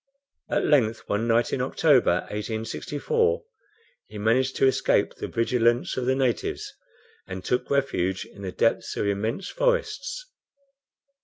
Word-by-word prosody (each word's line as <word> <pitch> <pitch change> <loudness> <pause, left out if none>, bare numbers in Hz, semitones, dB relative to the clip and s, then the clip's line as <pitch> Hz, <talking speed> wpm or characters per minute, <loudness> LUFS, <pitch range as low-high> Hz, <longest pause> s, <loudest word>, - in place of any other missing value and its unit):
At - - +1
length 115 -7 +2
one 105 +3 -1
night 115 +1 +2
in 125 - 0
October, 130 - +3
1864, 145 - -1 0.6
he - - -10
managed 125 +5 +1
to - - +3
escape 130 - +2
the - - -6
vigilance 120 0 +1
of 125 -1 -2
the 130 - +3
natives, 130 -3 -1 0.5
and 95 0 -7
took 125 - 0
refuge 95 -10 0
in 100 - -14
the 95 -2 -4
depths 115 +4 0
of - - 0
immense 110 - -1
forests. - - -1
120 Hz, 135 wpm, -25 LUFS, 110-140 Hz, 0.6 s, October